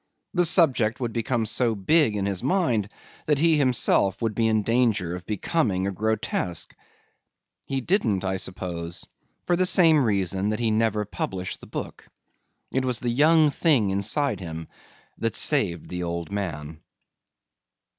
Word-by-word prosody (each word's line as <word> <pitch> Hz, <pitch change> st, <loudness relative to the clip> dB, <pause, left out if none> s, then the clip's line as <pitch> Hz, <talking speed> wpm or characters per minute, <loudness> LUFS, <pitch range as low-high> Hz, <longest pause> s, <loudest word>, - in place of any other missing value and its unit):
The 180 Hz, -1 st, +3 dB
subject 135 Hz, -, +4 dB
would 120 Hz, -3 st, -3 dB
become 115 Hz, 0 st, -1 dB
so 110 Hz, +2 st, +1 dB
big 115 Hz, -, +2 dB
in 100 Hz, -1 st, -2 dB
his 100 Hz, -2 st, -2 dB
mind 125 Hz, -, 0 dB, 0.4 s
that 150 Hz, -1 st, +2 dB
he 160 Hz, +1 st, +3 dB
himself 125 Hz, -7 st, +2 dB
would 115 Hz, -2 st, -2 dB
be 115 Hz, +1 st, 0 dB
in 110 Hz, -1 st, +1 dB
danger 110 Hz, -7 st, 0 dB
of 90 Hz, -, -10 dB
becoming 105 Hz, -, -1 dB
a 100 Hz, -, -1 dB
grotesque. 100 Hz, -4 st, -2 dB, 0.9 s
He 135 Hz, -1 st, -2 dB
didn't, 120 Hz, -, 0 dB
I 95 Hz, 0 st, -2 dB
suppose, 85 Hz, -2 st, -4 dB, 0.4 s
for 175 Hz, -, +1 dB
the 185 Hz, +1 st, +2 dB
same 160 Hz, -6 st, +5 dB
reason 100 Hz, -2 st, 0 dB
that 110 Hz, +1 st, -2 dB
he 115 Hz, -2 st, 0 dB
never 110 Hz, -1 st, 0 dB
published 95 Hz, -2 st, -5 dB
the -, -, -12 dB
book. -, -, -8 dB, 0.7 s
It 130 Hz, -, 0 dB
was 125 Hz, -2 st, +1 dB
the 120 Hz, -, -2 dB
young 155 Hz, +4 st, +4 dB
thing 135 Hz, -, +2 dB
inside 105 Hz, +4 st, 0 dB
him 80 Hz, -3 st, -7 dB, 0.5 s
that -, -, -2 dB
saved 85 Hz, -2 st, +2 dB
the 90 Hz, 0 st, -5 dB
old 85 Hz, +1 st, -4 dB
man. 80 Hz, -6 st, -5 dB
110 Hz, 155 wpm, -24 LUFS, 95-130 Hz, 0.9 s, same